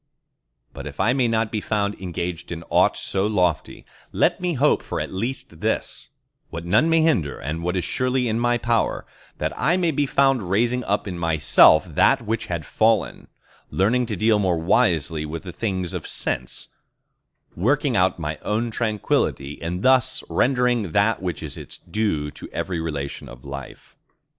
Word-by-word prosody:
But 70 0 -7
if 70 -1 -10
I 120 - +3
may 130 -2 +2
not 115 -1 0
be 110 - -2
found 105 -1 -1
engaged 90 -1 -4
in 85 -1 -5
aught - - +3
so 95 +1 -1
lofty, 90 -8 -1 0.3
let - - +1
me 175 -2 -1
hope 145 +3 +2 0.2
at - - -4
least 115 +8 -4
for - - -15
this—what 85 +1 -5
none 110 - +3
may 165 0 +4
hinder, 120 - +1 0.2
what 90 +2 -2
is 90 - 0
surely 125 0 0
in 110 0 0
my 120 0 +2
power—that 115 -1 -2
I 175 +4 +2
may 175 -3 +1
be 145 -1 0
found 135 -9 +2
raising 120 +5 +1
up 100 +1 -1
in 90 -3 -5
myself 80 0 +5
that 90 - +2
which 115 +1 -2
had 85 -4 -3
fallen; 110 +3 +1 0.4
learning 120 +6 +1
to 110 - -2
deal 110 +2 +3
more 95 -4 +1
wisely 80 -1 +1
with 80 +1 -6
the 90 - -7
things 95 -4 -3
of - - -5
sense; 60 0 -3 0.9
working 135 - +1
out 95 0 +2
my 75 -2 -4
own 115 +2 -1
tranquillity, 105 - -1
and 90 +3 -4
thus 130 -2 +3
rendering 125 -8 +1
that 100 +1 +2
which 90 -4 -4
is - - -7
its - - -10
due 80 -10 -2
to - - -11
every 90 -3 -3
relation 75 -6 -5
of - - -13
life. 70 -1 -9
100 Hz, 165 wpm, -23 LUFS, 85-120 Hz, 0.9 s, myself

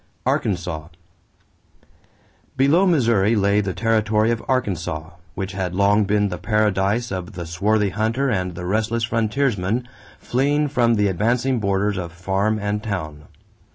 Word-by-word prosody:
=Arkansas.= 85 -5 -1 1.7
Below 150 +9 +4
Missouri 115 - +3
lay 100 0 +3
the 95 -3 -3
territory 110 -1 +2
of 115 - -2
Arkansas, 85 -10 -2 0.2
which 95 +1 -4
had 95 -2 -3
long 100 +2 +3
been 105 0 +1
the - - -5
paradise 105 +1 +1
of 95 +2 -5
the 85 -2 -6
swarthy 100 +5 +1
hunter 110 +8 0
and 90 -7 -1
the 90 +1 -6
restless 110 +4 0
frontiersman 115 -1 0 0.3
fleeing 145 +4 0
from 120 -4 +2
the 105 -1 +2
advancing 120 +7 +1
borders 100 0 0
of 85 -2 -4
farm 95 +5 0
and 105 0 -2
town. 80 -9 -5
105 Hz, 135 wpm, -21 LUFS, 95-115 Hz, 1.7 s, Below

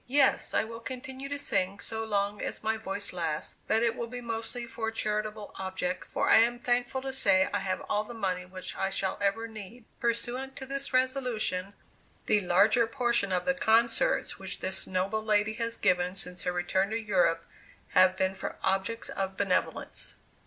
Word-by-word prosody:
Yes, 280 +3 +3
I - - +4
will 230 +1 -7
continue 260 +2 -6
to 285 - -2
sing 195 -8 0
so 225 +1 -2
long 205 -1 0
as - - -4
my 220 +1 +1
voice 200 -2 -3
lasts, 165 -4 -3
but 225 +1 +3
it 230 -1 +2
will 235 - -3
be 245 +1 -6
mostly 235 +1 -4
for 225 -1 -3
charitable 215 -1 -2
objects, 185 -1 -3
for - - 0
I - - +8
am 235 +2 +3
thankful 245 +2 0
to 270 0 -3
say 195 -7 +4
I - - +2
have 190 -1 -2
all 210 - 0
the 235 +2 -9
money 185 -4 -1
which 185 0 -7
I 195 - 0
shall 190 -1 -2
ever 200 +3 +1
need." 220 +2 -10
Pursuant 240 +3 -1
to 265 - -6
this 275 +1 -4
resolution, 250 -7 0 0.5
the 210 - +4
larger 205 +6 +4
portion 235 -5 +1
of 180 -1 0
the 270 - +3
concerts 235 - +2
which - - -5
this 190 +1 -2
noble 190 +4 0
lady 215 0 +2
has 230 0 -1
given 180 0 +2
since 180 -2 0
her 180 - +2
return 180 +2 +1
to 225 +1 -1
Europe, 180 -6 +2 0.4
have 185 0 +5
been 190 0 +1
for - - -5
objects 195 +4 0
of 190 0 -3
benevolence. 190 -2 -1
215 Hz, 185 wpm, -29 LUFS, 190-235 Hz, 0.5 s, I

